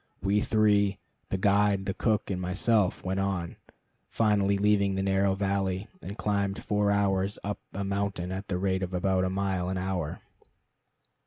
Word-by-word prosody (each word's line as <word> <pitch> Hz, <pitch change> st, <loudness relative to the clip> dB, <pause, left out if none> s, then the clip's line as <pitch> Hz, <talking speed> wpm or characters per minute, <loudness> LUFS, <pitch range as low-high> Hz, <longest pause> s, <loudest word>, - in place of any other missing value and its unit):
We 100 Hz, +1 st, +2 dB
three, 105 Hz, -2 st, +3 dB, 0.3 s
the 95 Hz, -, -1 dB
guide, 100 Hz, 0 st, +2 dB
the 95 Hz, -, -1 dB
cook, 105 Hz, 0 st, 0 dB
and 90 Hz, -1 st, -2 dB
myself, 95 Hz, +2 st, +1 dB
went 95 Hz, +1 st, -1 dB
on, 95 Hz, -4 st, -2 dB, 0.5 s
finally 100 Hz, -3 st, +2 dB
leaving 100 Hz, -1 st, +2 dB
the 95 Hz, -, -1 dB
narrow 95 Hz, 0 st, +2 dB
valley, 95 Hz, 0 st, -1 dB
and 100 Hz, -, -7 dB
climbing 100 Hz, -2 st, 0 dB
four 105 Hz, 0 st, +1 dB
hours 100 Hz, -1 st, +1 dB
up 100 Hz, -1 st, -3 dB
a 100 Hz, -, -4 dB
mountain 100 Hz, -2 st, -2 dB
at 95 Hz, +1 st, -5 dB
the 90 Hz, -, -1 dB
rate 95 Hz, 0 st, 0 dB
of 95 Hz, -1 st, -3 dB
about 95 Hz, 0 st, +1 dB
a -, -, 0 dB
mile 95 Hz, -1 st, -1 dB
an 95 Hz, -, -2 dB
hour. 90 Hz, -4 st, -3 dB
100 Hz, 165 wpm, -28 LUFS, 95-100 Hz, 0.5 s, three